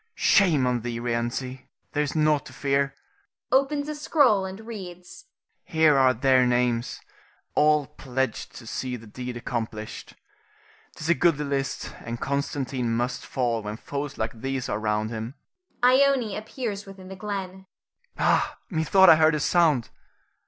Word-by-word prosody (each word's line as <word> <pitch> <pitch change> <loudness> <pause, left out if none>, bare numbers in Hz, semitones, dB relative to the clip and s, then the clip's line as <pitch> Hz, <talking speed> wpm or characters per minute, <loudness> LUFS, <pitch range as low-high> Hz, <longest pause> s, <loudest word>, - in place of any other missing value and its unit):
Shame 170 -10 +4
on 125 -1 0
thee, 120 0 -4
Rienzi, 120 +2 -3 0.2
there 150 - 0
is 145 +1 -2
nought 155 -2 +2
to - - -12
fear 140 0 0 0.6
[opens 285 +2 +2
a 305 - -3
scroll 280 - +3
and 190 +1 -7
reads]. 185 - -9 0.4
Here 160 -4 +3
are 130 -2 +4
their 130 +1 +4
names, 120 -1 0 0.5
all 150 -1 +4
pledged 130 -4 -3
to 120 - -10
see 125 +3 -3
the 115 -1 -10
deed 125 +3 -6
accomplished. 110 -2 -5 0.8
'Tis 160 0 -5
a - - +7
goodly 165 -4 +2
list 140 -1 -3
and 115 +1 -6
Constantine 135 -3 -2
must 125 +2 -1
fall 120 -3 -1
when 105 +1 -5
foes 145 +2 -5
like 110 0 -2
these 135 -1 -2
are - - -1
round 110 0 -1
him. 115 +4 -5 0.5
[Ione 255 -4 +4
appears 215 -2 -5
within 190 -1 -11
the 190 - -7
glen. 190 -1 -5 0.5
Ha! - - +2
methought 185 +3 +4
I 160 - +9
heard 155 0 +4
a - - -1
sound! 150 -6 +2
140 Hz, 150 wpm, -25 LUFS, 125-185 Hz, 0.8 s, I